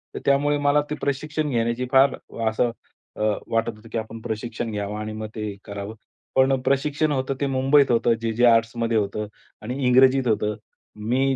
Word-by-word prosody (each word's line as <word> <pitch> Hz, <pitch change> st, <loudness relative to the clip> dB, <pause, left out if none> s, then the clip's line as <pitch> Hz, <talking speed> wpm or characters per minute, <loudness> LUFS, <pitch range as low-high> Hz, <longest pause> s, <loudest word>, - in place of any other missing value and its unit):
तर -, -, -3 dB
त्यामुळे 145 Hz, +1 st, +3 dB
मला 145 Hz, 0 st, +3 dB
ते 150 Hz, -, -2 dB
प्रशिक्षण 150 Hz, +2 st, -2 dB
घेण्याची 120 Hz, 0 st, 0 dB
फार 135 Hz, 0 st, +5 dB, 0.3 s
असं 115 Hz, +2 st, +1 dB, 0.5 s
अ, -, -, -5 dB, 0.3 s
वाटत 115 Hz, 0 st, 0 dB
होतं 105 Hz, +2 st, -16 dB
की -, -, -2 dB
आपण 110 Hz, 0 st, -5 dB
प्रशिक्षण 115 Hz, 0 st, -4 dB
घ्यावं 105 Hz, 0 st, -4 dB
आणि 110 Hz, 0 st, -4 dB
मग 110 Hz, 0 st, -5 dB
ते 105 Hz, -2 st, -4 dB
करावं. 100 Hz, +1 st, -6 dB, 0.4 s
पण 130 Hz, 0 st, +4 dB
प्रशिक्षण 145 Hz, +3 st, +1 dB
होतं 135 Hz, -1 st, -1 dB
ते -, -, +2 dB
मुंबईत 135 Hz, +1 st, +3 dB
होतं, 115 Hz, 0 st, +3 dB
जे-जे-आर्ट्समध्ये 115 Hz, 0 st, +2 dB
होतं 105 Hz, 0 st, -1 dB, 0.4 s
आणि 120 Hz, +4 st, -4 dB
इंग्रजीत 130 Hz, +1 st, +5 dB
होतं. 105 Hz, -1 st, +1 dB, 0.4 s
मी 130 Hz, +5 st, +1 dB
120 Hz, 165 wpm, -23 LUFS, 110-135 Hz, 0.5 s, फार